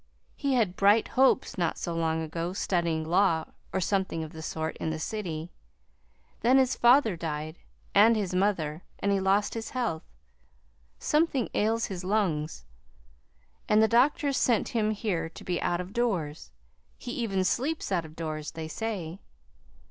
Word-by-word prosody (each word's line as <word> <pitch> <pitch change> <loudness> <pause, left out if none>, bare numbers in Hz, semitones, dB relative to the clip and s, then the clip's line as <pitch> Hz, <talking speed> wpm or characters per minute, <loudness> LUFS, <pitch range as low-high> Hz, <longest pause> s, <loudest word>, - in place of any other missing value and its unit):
He 280 -2 0
had 210 -7 +1
bright 205 +3 +4
hopes 260 -5 +2
not 170 -2 0
so 170 - -3
long 160 -1 0
ago 165 +3 -3
studying 170 -5 0
law, 165 -1 +2 0.3
or 190 - 0
something 190 -3 0
of 155 - -8
the 160 - -8
sort, 160 0 -3
in - - -2
the 160 - -2
city. 170 -3 -4 0.9
Then 250 +3 +4
his 260 -1 +3
father 240 -4 +5
died, 155 0 -5 0.3
and 220 +3 +6
his 200 -4 -2
mother, 180 -5 0 0.2
and 200 - 0
he 200 - +2
lost 195 +2 +2
his 225 -1 -5
health. 235 -11 -2 1.0
Something 300 -5 +1
ails 225 +2 +1
his 185 -2 -6
lungs, 170 - -1 1.0
and 210 - +5
the 220 - +5
doctors 275 +4 +3
sent 235 -4 +2
him 215 -2 +1
here 205 -6 -2
to - - -12
be 180 -2 -2
out 175 - 0
of 180 +2 -6
doors. 180 -11 -1 0.5
He 245 - -7
even 200 -6 -1
sleeps 270 - -1
out 175 -3 +1
of 155 -1 -12
doors, 155 -2 -4
they 160 -1 -5
say. 185 -2 -4
190 Hz, 160 wpm, -28 LUFS, 160-225 Hz, 1.0 s, and